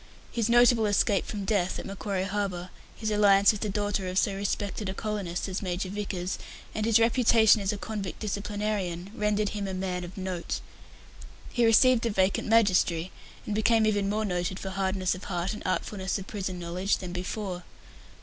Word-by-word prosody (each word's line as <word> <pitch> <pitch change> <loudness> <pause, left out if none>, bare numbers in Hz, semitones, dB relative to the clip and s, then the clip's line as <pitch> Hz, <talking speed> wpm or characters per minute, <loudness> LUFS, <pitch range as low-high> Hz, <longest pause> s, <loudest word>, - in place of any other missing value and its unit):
His 230 -1 0
notable 240 -2 +5
escape 205 0 +2
from 205 -2 -4
death 190 -3 0
at - - -6
Macquarie 195 -1 -3
Harbour, 190 -2 -3 0.2
his 215 -1 -3
alliance 200 -1 +5
with 210 - -6
the 215 - -1
daughter 205 -1 -1
of 185 0 -3
so 200 - +2
respected 200 0 -2
a 190 - -4
colonist 200 -5 -3
as 190 0 -3
Major 185 -1 -2
Vickers, 190 -2 -3 0.3
and 215 0 -1
his 230 -1 +5
reputation 230 -2 +5
as 195 - 0
a 210 - -4
convict 200 -3 -5
disciplinarian 200 -3 -3
rendered 210 -2 0
him 205 -2 -4
a 190 - -4
man 185 -1 -2
of 175 +2 -9
note. 185 -2 -3 0.9
He 240 -2 +3
received 240 +2 +5
a - - 0
vacant 190 -2 +1
magistracy, 185 -6 +3 0.3
and 210 - -3
became 220 +1 +3
even 205 -2 +1
more 215 +1 0
noted 180 -1 -2
for 190 - -5
hardness 190 -1 0
of 185 - -8
heart 175 0 -2
and 215 - -8
artfulness 190 +1 -1
of 195 - -7
prison 190 -3 -4
knowledge 175 +3 -1
than 180 -2 -7
before. 180 0 -4
200 Hz, 180 wpm, -28 LUFS, 185-215 Hz, 0.9 s, notable